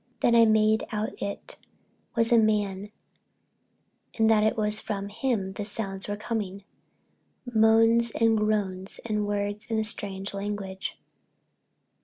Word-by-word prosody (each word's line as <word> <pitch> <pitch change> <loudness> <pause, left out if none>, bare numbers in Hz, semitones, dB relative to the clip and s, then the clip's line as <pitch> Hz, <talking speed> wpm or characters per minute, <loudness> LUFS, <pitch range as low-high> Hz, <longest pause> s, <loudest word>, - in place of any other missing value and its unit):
Then 235 - +3
I 230 -1 +7
made 220 0 +3
out 215 0 -2
it 200 0 -6 0.6
was 230 0 +2
a 235 - +7
man 205 -2 0 1.3
and 220 -1 +4
that 215 -1 +4
it 215 - +1
was 210 0 +1
from 200 -2 -4
him 210 -3 -2
the 205 - -4
sounds 195 -2 -3
were 205 0 -3
coming—moans 225 +2 0
and 225 0 +2
groans 205 -3 -1
and 210 -2 -1
words 205 +1 -3
in 225 - 0
a 220 - +1
strange 200 -2 -3
language. 200 -1 -5
210 Hz, 130 wpm, -27 LUFS, 200-225 Hz, 1.3 s, I